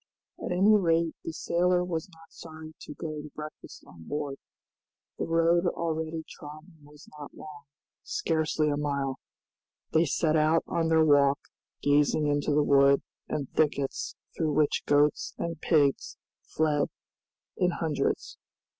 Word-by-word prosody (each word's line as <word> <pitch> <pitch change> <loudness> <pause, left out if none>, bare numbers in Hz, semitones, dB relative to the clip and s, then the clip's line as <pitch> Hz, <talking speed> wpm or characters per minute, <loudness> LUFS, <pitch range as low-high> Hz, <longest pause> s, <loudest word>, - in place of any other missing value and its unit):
At - - -3
any 195 +4 +5
rate 165 -4 +2
the - - -4
sailor 180 +2 +1
was 170 -1 -3
not 165 -2 -19
sorry 160 -1 -11
to 150 - -9
go 155 -3 -5
to 150 - -10
breakfast 155 0 -9
on 85 -2 -15
board. 145 -2 -3 0.8
The - - -2
road 165 +2 +3
already 160 -1 -2
trodden 155 +3 -12
was 145 0 -16
not 145 - -9
long, 145 -2 -11 0.4
scarcely 160 -1 0
a 145 - 0
mile. 140 -2 -2 0.7
They 160 +1 +4
set 155 +1 +1
out 155 +1 +3
on 165 -1 -1
their 160 -1 +4
walk, 140 -2 +5 0.5
gazing 145 +1 +3
into 145 0 0
the 150 +1 +3
wood 140 -1 +4 0.3
and 140 -3 -2
thickets 140 -3 0 0.2
through 155 -2 0
which 150 0 +1
goats 145 0 +2
and 165 -2 -4
pigs 145 -5 +2 0.3
fled 150 -2 +1 0.7
in 180 - +2
hundreds. 160 -4 -2
155 Hz, 140 wpm, -28 LUFS, 145-165 Hz, 0.8 s, any